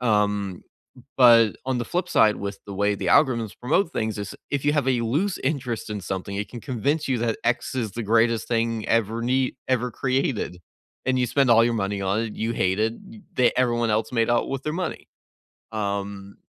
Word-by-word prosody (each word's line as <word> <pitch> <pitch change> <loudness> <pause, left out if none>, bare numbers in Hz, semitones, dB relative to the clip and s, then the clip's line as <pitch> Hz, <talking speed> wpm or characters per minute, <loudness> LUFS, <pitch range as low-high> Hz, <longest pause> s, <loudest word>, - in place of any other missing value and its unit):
Um, 105 -5 0 0.6
but 115 -4 +6
on 130 -2 0
the 120 - -2
flip 180 +1 -2
side 105 -10 +4
with 100 0 -5
the 100 - -6
way 100 +1 +1
the - - -4
algorithms 115 -7 +3
promote 160 +8 +1
things 110 - -2
is 100 -1 -5 0.2
if 140 -1 -1
you 145 - +3
have 145 -3 +1
a 125 -3 +2
loose 155 - 0
interest 130 -6 -2
in 105 -1 -4
something, 95 +2 -4
it 100 -1 -3
can 120 - -8
convince 145 +4 -1
you 130 -2 +1
that 115 -1 0
X 120 +3 0
is 115 -5 -2
the 120 - -4
greatest 115 +1 +2
thing 115 -2 -1
ever 115 0 +1
nee 130 +1 +1
ever 125 -1 +1
created. 130 -7 -1 0.5
And 130 0 +2
you 125 - +2
spend 135 +1 +2
all 115 0 +6
your 120 - +1
money 100 -2 -2
on 100 +3 0
it. 115 -2 -4
You 115 +1 -1
hate 95 -1 0
it. 110 +1 +1 0.4
They 125 -2 +4
everyone 120 -2 +2
else 110 +2 0
made 115 -1 +2
out 120 +2 +1
with 135 0 -3
their 150 - -2
money. 185 +1 -4 0.7
Um, 100 -2 -4
115 Hz, 205 wpm, -24 LUFS, 105-130 Hz, 0.7 s, but